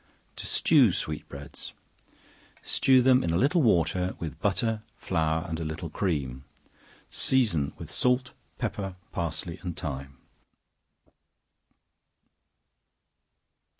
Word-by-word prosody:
To - - -3
Stew - - +5
Sweet 75 -1 -4
Breads. 70 +1 -9 0.9
Stew 130 -1 +4
them 130 0 +5
in 85 - 0
a 85 - +2
little 150 - +3
water, 90 - +2
with 80 -5 -6
butter, 110 -2 0 0.2
flour, 80 -1 0
and 80 -1 -3
a - - -2
little 80 +1 -5
cream; 70 -10 -2 0.7
season 105 - +2
with - - -8
salt, 125 0 +1 0.2
pepper, 95 -2 -3 0.2
parsley 85 -1 -4
and 90 -2 -5
thyme. 70 -6 -5
85 Hz, 105 wpm, -28 LUFS, 80-110 Hz, 0.9 s, Stew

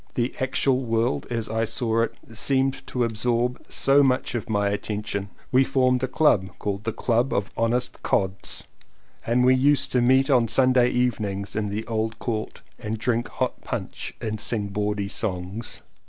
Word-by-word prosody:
The 120 0 0
actual 130 0 +1
world 115 0 0
as 115 -2 -2
I 110 +1 -1
saw 115 0 0
it 115 - -1 0.2
seemed 135 +3 +1
to 125 - -1
absorb 120 +2 0
so 140 +1 +4
much 130 -2 +1
of 120 -3 -4
my 105 -2 +1
attention. 100 -1 -3 0.2
We 130 +1 +5
formed 130 -1 +2
a 130 - 0
club 120 -9 +3
called 100 +1 -3
the 115 - 0
Club 120 +3 0
of 100 0 -1
the - - -5
Honest 120 +2 0
Cods, 95 0 -1 0.6
and 125 +2 +3
we 130 - +6
used 140 +2 +3
to 125 - +3
meet 130 +2 +4
on 125 -5 +4
Sunday 130 0 +4
eve 125 -1 +1
nings 100 -1 -4
in 105 -1 -1
the 105 +2 -3
old 110 0 -2
court 110 -3 -4 0.2
and 110 +1 -3
drink 120 +1 0
hot - - -3
punch - - -5
and 110 -1 -3
sing 105 -3 -1
bawdy 105 0 -1
songs. 100 +2 -3
115 Hz, 175 wpm, -24 LUFS, 105-125 Hz, 0.6 s, we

